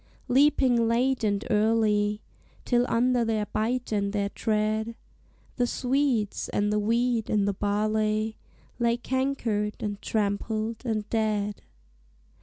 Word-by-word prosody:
Leaping 260 Hz, -3 st, +4 dB
late 250 Hz, +2 st, +1 dB
and 205 Hz, 0 st, 0 dB
early, 210 Hz, -1 st, +2 dB, 0.4 s
Till 245 Hz, 0 st, +2 dB
under 245 Hz, +1 st, +2 dB
their 220 Hz, -2 st, 0 dB
bite 240 Hz, +4 st, -2 dB
and 200 Hz, -1 st, 0 dB
their 200 Hz, -1 st, 0 dB
tread, 215 Hz, +2 st, -1 dB, 0.6 s
The 245 Hz, -1 st, +2 dB
swedes, 250 Hz, -5 st, 0 dB
and 205 Hz, 0 st, 0 dB
the 210 Hz, -, +2 dB
wheat, 230 Hz, +1 st, +1 dB
and 205 Hz, -2 st, +2 dB
the 200 Hz, -, +1 dB
barley 215 Hz, +2 st, 0 dB, 0.4 s
Lay 235 Hz, 0 st, +2 dB
cankered, 240 Hz, -5 st, -1 dB
and 205 Hz, -1 st, -4 dB
trampled, 215 Hz, +2 st, -2 dB
and 215 Hz, -2 st, -1 dB
dead. 210 Hz, -2 st, 0 dB
220 Hz, 120 wpm, -27 LUFS, 210-240 Hz, 0.6 s, Leaping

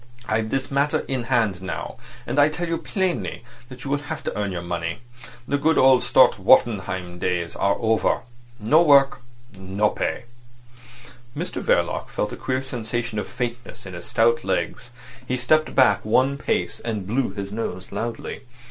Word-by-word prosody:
I've 110 Hz, 0 st, 0 dB
this 135 Hz, +4 st, -2 dB
matter 140 Hz, +2 st, +1 dB
in 130 Hz, -3 st, -2 dB
hand 115 Hz, -8 st, +1 dB
now, 95 Hz, -, -5 dB, 0.3 s
and 145 Hz, -, 0 dB
I 145 Hz, +1 st, +6 dB
tell 170 Hz, +3 st, -4 dB
you 165 Hz, 0 st, -1 dB
plainly 175 Hz, -, -2 dB, 0.3 s
that 125 Hz, -1 st, -10 dB
you 140 Hz, -, -3 dB
will 145 Hz, -, +1 dB
have 145 Hz, -, -6 dB
to -, -, -3 dB
earn 105 Hz, -2 st, -2 dB
your 90 Hz, -1 st, -4 dB
money. 85 Hz, +3 st, -3 dB, 0.5 s
The 145 Hz, -, 0 dB
good 160 Hz, +3 st, +2 dB
old 130 Hz, -1 st, +6 dB
Stott -, -, +4 dB
Wartenheim 95 Hz, -5 st, +2 dB
times 90 Hz, -2 st, -1 dB
are 100 Hz, 0 st, +2 dB
over. 110 Hz, 0 st, +1 dB, 0.4 s
No 130 Hz, +10 st, +4 dB
work, 140 Hz, -5 st, +5 dB, 0.3 s
no 95 Hz, +2 st, 0 dB
pay." -, -, -2 dB, 1.1 s
Mr -, -, -4 dB
Verloc -, -, +1 dB
felt 105 Hz, -, -2 dB
a -, -, -4 dB
queer 130 Hz, 0 st, -2 dB
sensation 120 Hz, -3 st, -3 dB
of 100 Hz, -, -4 dB
faintness 120 Hz, -3 st, -5 dB
in 95 Hz, -, -8 dB
his 85 Hz, 0 st, -8 dB
stout 115 Hz, +1 st, +2 dB
legs. 120 Hz, -, -2 dB, 0.4 s
He 125 Hz, -, 0 dB
stepped 155 Hz, +5 st, +2 dB
back 110 Hz, -6 st, +4 dB
one 130 Hz, +6 st, +2 dB
pace, -, -, -1 dB
and 110 Hz, -4 st, -4 dB
blew 120 Hz, +6 st, 0 dB
his 100 Hz, -1 st, -5 dB
nose 95 Hz, -4 st, -5 dB
loudly. 115 Hz, 0 st, -4 dB
115 Hz, 170 wpm, -23 LUFS, 100-135 Hz, 1.1 s, I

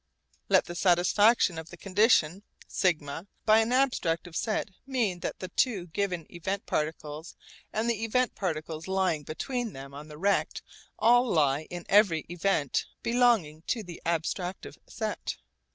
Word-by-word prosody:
Let -, -, +5 dB
the 175 Hz, -, -6 dB
satisfaction 180 Hz, +2 st, +3 dB
of 160 Hz, 0 st, -9 dB
the -, -, -11 dB
condition 195 Hz, -3 st, +3 dB, 0.3 s
σ 185 Hz, -, +3 dB, 0.5 s
by 220 Hz, 0 st, +6 dB
an 225 Hz, +1 st, +1 dB
abstractive 185 Hz, -10 st, 0 dB
set 215 Hz, +1 st, -1 dB, 0.2 s
mean 230 Hz, -10 st, 0 dB
that -, -, -4 dB
the 185 Hz, -, -6 dB
two 200 Hz, -3 st, +1 dB
given 180 Hz, -2 st, -2 dB
event 190 Hz, +4 st, -3 dB
particles 155 Hz, +1 st, -3 dB, 0.4 s
and 220 Hz, +2 st, -1 dB
the 225 Hz, -2 st, 0 dB
event 250 Hz, +3 st, +1 dB
particles 160 Hz, -3 st, -4 dB
lying 190 Hz, -5 st, +1 dB
between 235 Hz, -, -4 dB
them 135 Hz, +1 st, -9 dB
on 145 Hz, +2 st, -9 dB
the 150 Hz, -1 st, -11 dB
rect 200 Hz, +5 st, 0 dB, 0.3 s
all 245 Hz, +2 st, +5 dB
lie 150 Hz, -1 st, +2 dB
in 175 Hz, -1 st, -7 dB
every 195 Hz, -6 st, +4 dB
event 170 Hz, -5 st, 0 dB, 0.2 s
belonging 235 Hz, -11 st, +2 dB
to 230 Hz, -3 st, -1 dB
the 175 Hz, -3 st, -10 dB
abstractive 175 Hz, +2 st, -3 dB
set. 220 Hz, -2 st, -4 dB
185 Hz, 145 wpm, -28 LUFS, 160-220 Hz, 0.5 s, by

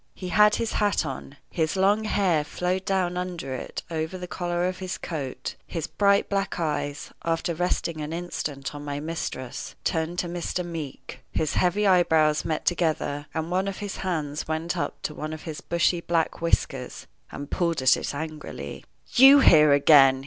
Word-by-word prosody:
He 185 Hz, -, -6 dB
had 210 Hz, +3 st, +5 dB
his 230 Hz, -1 st, -2 dB
hat 205 Hz, -2 st, +1 dB
on. 145 Hz, -, -7 dB
His 160 Hz, -1 st, 0 dB
long 200 Hz, +3 st, +3 dB
hair 185 Hz, -7 st, +2 dB
flowed 180 Hz, +5 st, -2 dB
down 185 Hz, -2 st, 0 dB
under 175 Hz, -7 st, -4 dB
it 130 Hz, -, -5 dB
over 160 Hz, +3 st, -2 dB
the 180 Hz, -, -6 dB
collar 175 Hz, 0 st, -1 dB
of 185 Hz, 0 st, -4 dB
his 185 Hz, -1 st, -4 dB
coat; 145 Hz, -6 st, -5 dB
his 165 Hz, -3 st, -3 dB
bright 200 Hz, -1 st, +2 dB
black 195 Hz, -2 st, -1 dB
eyes, 150 Hz, -3 st, -2 dB
after 170 Hz, +1 st, 0 dB
resting 170 Hz, -1 st, -1 dB
an 150 Hz, +1 st, -4 dB
instant 150 Hz, -5 st, -4 dB
on 145 Hz, 0 st, -7 dB
my 145 Hz, -1 st, -4 dB
mistress, 145 Hz, -5 st, -5 dB
turned 160 Hz, +2 st, -1 dB
to 180 Hz, -, -1 dB
Mr. 175 Hz, +1 st, -3 dB
Meeke. 160 Hz, -6 st, -7 dB
His 155 Hz, -1 st, -1 dB
heavy 185 Hz, +4 st, +2 dB
eyebrows 160 Hz, -5 st, +4 dB
met 155 Hz, -1 st, -2 dB
together, 155 Hz, -4 st, 0 dB
and 160 Hz, +1 st, -2 dB
one 190 Hz, +2 st, +1 dB
of 195 Hz, -, -3 dB
his 205 Hz, -1 st, -5 dB
hands 155 Hz, -6 st, -3 dB
went 160 Hz, +3 st, -2 dB
up 170 Hz, -, -3 dB
to 150 Hz, -, -3 dB
one 155 Hz, +1 st, -5 dB
of 155 Hz, -, -8 dB
his 160 Hz, -3 st, -6 dB
bushy 170 Hz, 0 st, +1 dB
black 165 Hz, -1 st, 0 dB
whiskers, 135 Hz, -5 st, -1 dB, 0.3 s
and 145 Hz, +1 st, -7 dB
pulled 170 Hz, -6 st, 0 dB
at 130 Hz, 0 st, +6 dB
it -, -, -4 dB
angrily. 150 Hz, -, -6 dB, 0.3 s
"You 270 Hz, +2 st, +9 dB
here 150 Hz, -, +7 dB
again!" 140 Hz, -2 st, +6 dB
165 Hz, 180 wpm, -26 LUFS, 150-180 Hz, 0.3 s, You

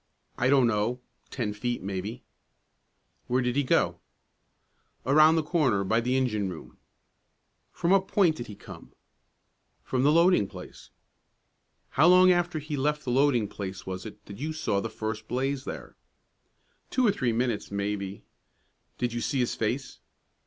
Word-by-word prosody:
"I 125 Hz, -, +1 dB
don't 135 Hz, -2 st, +5 dB
know; 115 Hz, +2 st, 0 dB, 0.3 s
ten 110 Hz, -6 st, -3 dB
feet, 120 Hz, 0 st, -3 dB
maybe." 100 Hz, +5 st, -5 dB, 1.0 s
"Where 125 Hz, +1 st, +1 dB
did 125 Hz, 0 st, -1 dB
he 145 Hz, -, +3 dB
go?" 130 Hz, -, +1 dB, 1.1 s
"Around 155 Hz, +4 st, +6 dB
the 160 Hz, -, +1 dB
corner, 150 Hz, -, +1 dB
by 110 Hz, +4 st, +1 dB
the 125 Hz, +2 st, 0 dB
engine 110 Hz, -7 st, 0 dB
room." 65 Hz, -8 st, -10 dB, 0.9 s
"From 175 Hz, 0 st, -1 dB
what 190 Hz, -1 st, +4 dB
point 175 Hz, -7 st, +3 dB
did 120 Hz, -, -6 dB
he 105 Hz, -, -9 dB
come?" -, -, -12 dB, 0.9 s
"From 130 Hz, -, -1 dB
the 145 Hz, +3 st, +4 dB
loading 170 Hz, -, +4 dB
place." -, -, -12 dB, 1.0 s
"How 150 Hz, +6 st, +4 dB
long 185 Hz, +1 st, +7 dB
after 175 Hz, -2 st, +1 dB
he 150 Hz, 0 st, -4 dB
left 150 Hz, +2 st, -1 dB
the 125 Hz, -, -1 dB
loading 130 Hz, -4 st, +3 dB
place 95 Hz, -1 st, -7 dB
was 95 Hz, 0 st, -5 dB
it 105 Hz, -, -13 dB
that 100 Hz, +1 st, -10 dB
you 155 Hz, +3 st, -3 dB
saw 105 Hz, -10 st, -1 dB
the -, -, -4 dB
first 110 Hz, 0 st, -5 dB
blaze 135 Hz, +2 st, -2 dB
there?" -, -, -7 dB, 0.9 s
"Two 255 Hz, -, +1 dB
or 210 Hz, -, +5 dB
three 130 Hz, -11 st, -1 dB
minutes, 115 Hz, -1 st, -1 dB
maybe." 100 Hz, -1 st, -3 dB, 0.7 s
"Did 120 Hz, -1 st, -2 dB
you 120 Hz, -, -3 dB
see 140 Hz, -, -1 dB
his 125 Hz, -2 st, +1 dB
face?" 125 Hz, +4 st, -3 dB
125 Hz, 160 wpm, -27 LUFS, 105-150 Hz, 1.1 s, long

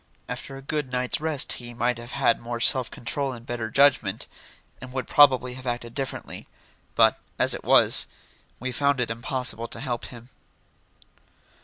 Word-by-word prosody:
After 135 Hz, -, -6 dB
a 135 Hz, -, -11 dB
good 145 Hz, -2 st, -3 dB
night's 125 Hz, +3 st, -1 dB
rest 155 Hz, -4 st, +1 dB
he 120 Hz, -1 st, -7 dB
might 120 Hz, 0 st, 0 dB
have 120 Hz, +1 st, -10 dB
had 135 Hz, -4 st, +2 dB
more 120 Hz, 0 st, -5 dB
self 125 Hz, +1 st, +4 dB
control 135 Hz, +3 st, -2 dB
and 120 Hz, -1 st, -11 dB
better 120 Hz, -2 st, -4 dB
judgment, 140 Hz, +2 st, +3 dB, 0.6 s
and 130 Hz, 0 st, -9 dB
would 130 Hz, 0 st, -3 dB
probably 130 Hz, -3 st, +5 dB
have 130 Hz, 0 st, -9 dB
acted 120 Hz, -1 st, -3 dB
differently. 135 Hz, 0 st, -5 dB, 0.5 s
But, -, -, +4 dB, 0.2 s
as -, -, +3 dB
it -, -, -6 dB
was, -, -, +4 dB, 0.5 s
we 130 Hz, +2 st, -3 dB
found 140 Hz, +2 st, +1 dB
it 115 Hz, -2 st, -1 dB
impossible 120 Hz, 0 st, -2 dB
to -, -, -8 dB
help 125 Hz, -3 st, -3 dB
him. 120 Hz, 0 st, -12 dB
125 Hz, 165 wpm, -25 LUFS, 120-135 Hz, 0.6 s, probably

